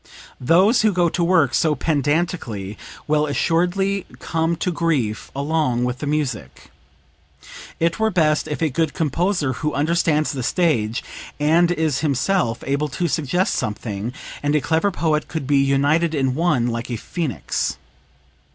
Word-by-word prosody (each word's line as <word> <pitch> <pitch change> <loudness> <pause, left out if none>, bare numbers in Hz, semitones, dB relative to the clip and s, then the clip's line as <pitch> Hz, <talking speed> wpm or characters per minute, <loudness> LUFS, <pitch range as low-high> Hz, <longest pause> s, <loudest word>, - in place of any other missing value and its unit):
Those 185 - +4
who 215 -1 +3
go 175 -1 +2
to 175 - -1
work 170 -7 +3
so 155 -2 +2
pedantically 145 - -1 0.3
will 150 0 +2
assuredly 180 +7 0
come 165 0 -1
to 180 +2 -2
grief 150 -11 -1
along 140 -4 0
with 125 +1 -2
the 150 - -4
music. 130 - -3 1.1
It 165 +5 0
were 220 0 +2
best 155 -6 +2
if 150 +2 -3
a 155 - +1
good 160 +2 -1
composer, 160 -1 0
who 150 +3 -3
understands 155 0 +1
the 135 -4 -4
stage, 120 - 0 0.4
and 165 +4 +3
is 160 -5 0
himself 145 -3 0
able 140 +2 0
to 170 +5 -2
suggest 165 +5 0
something, 105 +1 -3 0.3
and 145 +1 +1
a - - +4
clever 160 +7 +1
poet 155 -4 0
could 160 -4 -4
be 140 +1 +2
united 145 +4 +2
in 135 -2 +1
one, 150 -5 +1
like 115 0 -3
a 120 - -2
phoenix. 150 - -3
150 Hz, 150 wpm, -21 LUFS, 135-170 Hz, 1.1 s, Those